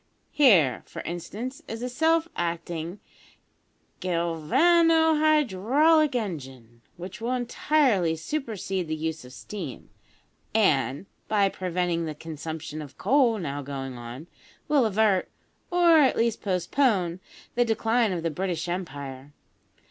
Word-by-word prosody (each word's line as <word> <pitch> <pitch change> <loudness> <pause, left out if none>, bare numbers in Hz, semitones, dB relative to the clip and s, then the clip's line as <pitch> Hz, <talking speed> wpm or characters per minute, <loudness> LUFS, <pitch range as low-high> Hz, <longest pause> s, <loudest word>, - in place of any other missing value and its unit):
Here, 195 - +4
for - - -8
instance, 215 +10 -6
is 225 +2 -6
a - - -1
self 320 +6 +2
acting 170 +1 -3 1.0
galvano 310 - +3
hydraulic 300 - +3
engine, 135 - -5 0.2
which 185 +5 -8
will 240 +2 -1
entirely 245 - +1
supersede 195 - -3
the 155 - -2
use 160 -1 -4
of 125 - -12
steam, 200 +10 -8 0.6
and, 140 - +2 0.2
by 205 -2 +3
preventing 180 -2 -2
the 155 - -5
consumption 155 -1 -6
of 145 -3 -11
coal 240 0 +3
now 145 -6 -4
going 135 -2 -6
on, 120 +5 -8 0.4
will 285 -6 +3
avert, 210 -2 +2 0.4
or 345 -2 +5
at 275 -3 +4
least 230 -1 +1
postpone, 185 -2 +1 0.3
the 245 - +3
decline 225 0 +1
of 170 -3 -3
the 165 - 0
British 175 +1 -3
Empire. 145 -6 -6
185 Hz, 120 wpm, -26 LUFS, 160-245 Hz, 1.0 s, or